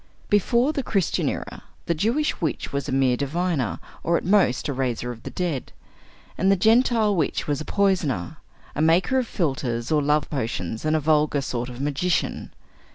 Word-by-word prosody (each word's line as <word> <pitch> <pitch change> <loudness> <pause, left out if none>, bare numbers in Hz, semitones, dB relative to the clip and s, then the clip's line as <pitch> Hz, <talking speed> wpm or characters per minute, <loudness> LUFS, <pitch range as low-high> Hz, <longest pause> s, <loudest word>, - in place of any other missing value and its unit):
Before 235 +7 +3
the 280 - -1
Christian 195 -8 0
era, - - -6 0.2
the 170 - +1
Jewish 235 - 0
witch 155 -4 -2
was 140 -1 -2
a - - -2
mere 130 -2 +3
diviner 155 +1 -1 0.2
or 170 +1 +2
at - - -5
most 185 -9 +3
a 140 - -1
raiser 125 -2 -2
of 115 -1 -10
the - - -7
dead, 170 -8 -3 0.7
and 190 +1 +4
the - - +5
Gentile 220 0 +3
witch 160 -5 0
was 145 0 -1
a - - -6
poisoner, 180 - 0 0.4
a - - -2
maker 175 +11 +3
of 250 - -2
philtres 135 - -2
or 155 -1 +3
love 150 +1 +1
potions, 110 - -3
and 155 0 +2
a - - +3
vulgar 150 -1 +2
sort 125 -2 -3
of 125 0 -9
magician. 145 +5 -1
155 Hz, 180 wpm, -24 LUFS, 135-190 Hz, 0.7 s, the